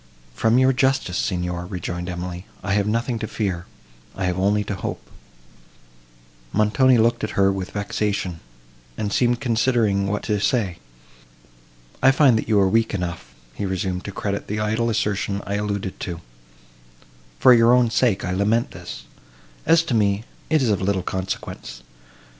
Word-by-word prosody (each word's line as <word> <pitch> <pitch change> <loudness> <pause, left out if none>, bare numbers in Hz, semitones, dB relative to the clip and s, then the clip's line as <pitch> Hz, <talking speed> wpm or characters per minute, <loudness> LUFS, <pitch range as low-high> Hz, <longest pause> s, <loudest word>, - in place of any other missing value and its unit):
"From 110 - +2
your 130 +1 +4
justice, 130 -7 +1
Signor," 90 -2 -2
rejoined 90 -1 -4
Emily, 90 +2 -5 0.2
"I 100 - -1
have 100 0 +1
nothing 115 +2 -1
to 110 - -3
fear—I 90 - -6
have 90 -1 0
only 105 +2 +2
to 105 - -4
hope." 95 - -5 1.4
Montoni 120 +5 +4
looked 115 +1 +2
at 110 - -3
her 100 0 +4
with 95 -1 -4
vexation, 100 -4 -2 0.6
and 105 -1 -2
seemed 120 -1 +2
considering 115 -5 +1
what 105 +1 -2
to 105 -2 0
say. 100 -5 0 1.2
"I 135 - +6
find 135 -2 +5
that - - -5
you 105 -2 +4
are 95 - +4
weak 115 +2 +1
enough," 85 -3 -5 0.2
he 65 - -5
resumed, 95 -1 -2
"to 100 - -4
credit 100 0 -3
the 105 +1 -2
idle 110 +2 0
assertion 100 -2 -1
I 100 - -3
alluded 100 -2 -3
to! 85 -3 -5 1.2
For 125 - +7
your 115 0 +5
own 125 -2 +4
sake 110 -5 +2
I 90 - -2
lament 105 +5 +1
this; - - -8 0.6
as 165 +1 +5
to 165 - -3
me, 105 -1 +2 0.3
it 155 -3 +3
is 120 - +2
of 100 -2 +1
little 95 -1 0
consequence. 90 -10 -5
105 Hz, 160 wpm, -22 LUFS, 95-115 Hz, 1.4 s, For